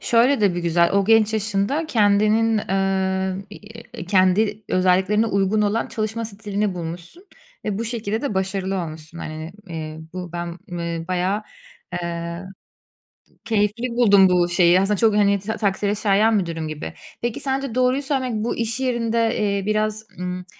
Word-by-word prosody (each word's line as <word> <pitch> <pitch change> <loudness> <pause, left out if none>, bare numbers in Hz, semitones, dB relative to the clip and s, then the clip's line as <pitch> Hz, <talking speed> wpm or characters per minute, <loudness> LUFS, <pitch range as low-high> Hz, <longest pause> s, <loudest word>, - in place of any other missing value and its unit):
şöyle 240 +2 +3
de 195 -4 +3
bir 175 - -2
güzel, 170 0 +2
o 200 -1 +3
genç 220 0 +4
yaşında 215 +8 0
kendinin, 215 -2 +3
eee, 190 -1 0
iii, 225 -1 -11
kendi 205 +3 +2
özelliklerine 190 +4 +3
uygun 200 +1 +1
olan 210 +3 0
çalışma 220 +1 -3
stilini 205 -2 -3
bulmuşsun 175 - -8 0.4
ve 205 -1 -2
bu 230 - -2
şekilde 225 -1 -3
de 280 -9 -2
başarılı 190 0 -1
olmuşsun. 160 +1 -8
Hani, 155 +2 -6 0.2
eee, 155 -1 -6
bu 180 -2 -6
ben, 170 0 -5
eee, 170 -1 -4
bayağı, 185 +3 0 0.6
eee, 170 +1 -4 1.0
keyifli 220 +2 0
buldum 205 -6 +5
bu 175 -1 +3
şeyi. 175 0 +5
Aslında 205 +1 +1
çok, 220 0 +3
hani, 200 -1 +3
tak 220 +3 -4
takdire 205 0 0
şayan 210 +1 +3
bir 185 - -1
durum 165 -1 -4
gibi. 150 - -6 0.3
Peki 240 -1 -2
sence 270 -3 -2
doğruyu 255 +2 +2
söylemek 265 -3 -1
bu 235 - -1
iş 230 +2 -2
yerinde, 230 -3 0
eee, 200 -2 0
biraz, 215 0 0
ımm, 180 0 -4
200 Hz, 155 wpm, -22 LUFS, 180-225 Hz, 1.0 s, buldum